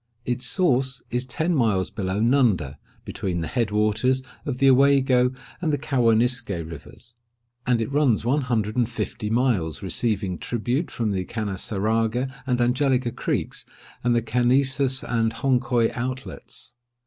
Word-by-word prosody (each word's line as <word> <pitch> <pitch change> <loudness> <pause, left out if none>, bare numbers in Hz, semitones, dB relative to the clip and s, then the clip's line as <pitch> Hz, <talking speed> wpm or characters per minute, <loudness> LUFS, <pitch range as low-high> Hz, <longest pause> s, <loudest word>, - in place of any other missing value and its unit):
Its 125 0 -2
source 135 -8 +1
is 125 +1 -2
ten 160 +7 -1
miles 110 - +1
below 100 -2 -2
Nunda, 110 - +2 0.3
between 90 -3 -3
the 80 - -3
head 120 -5 0
waters 110 +5 +1 0.2
of 130 -3 -2
the 135 - +3
Owago 130 -2 +4 0.3
and 160 -3 +1
the 145 - +1
Cawanisque 125 -3 +2
rivers; 85 - -7 0.5
and 125 -2 +3
it 115 +4 -2
runs 135 -7 +2
one 140 +5 +2
hundred 115 -4 -1
and 120 -2 +1
fifty 110 -2 -4
miles, 110 - 0
receiving 95 -2 -1
tribute 125 +6 -2
from 115 -4 -2
the 95 -2 -1
Canassaraga 110 +5 -1
and 125 -1 +1
Angelica 125 0 +2
creeks, - - -2 0.4
and 120 0 +2
the 115 - +1
Canesus 130 +3 +2
and 115 -1 0
Honcoye 120 -2 +1
outlets. 130 +2 -5
120 Hz, 140 wpm, -24 LUFS, 110-130 Hz, 0.5 s, Owago